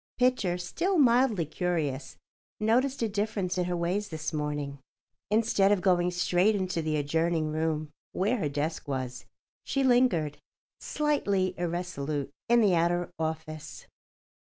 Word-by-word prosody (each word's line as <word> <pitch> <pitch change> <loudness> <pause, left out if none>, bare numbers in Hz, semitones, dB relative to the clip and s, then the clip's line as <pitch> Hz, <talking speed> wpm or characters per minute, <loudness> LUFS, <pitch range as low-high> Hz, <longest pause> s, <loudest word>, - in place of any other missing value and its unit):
Pitcher, 250 -8 +2
still 350 - -1
mildly 240 - +4
curious, 155 -4 -2 0.4
noticed 245 +4 +2
a - - +2
difference 205 -3 -1
in 180 - +1
her 175 0 -1
ways 185 +5 -1
this 160 0 -4
morning. 145 -2 -3 0.5
Instead 210 -2 +3
of 205 - +3
going 180 -1 +3
straight 180 +3 +2
into 185 -4 -1
the 155 -1 -1
adjoining 160 +2 0
room, 155 -1 -1 0.2
where 210 +7 +1
her 155 -9 -1
desk 150 +3 -3
was, 130 -2 -4 0.4
she 275 - 0
lingered, 240 - +3 0.4
slightly 200 -12 0
irresolute, 165 -5 -3 0.2
in 235 0 +5
the 200 -4 +4
outer 175 +1 +1
office. 160 -1 -5
175 Hz, 135 wpm, -28 LUFS, 155-210 Hz, 0.5 s, in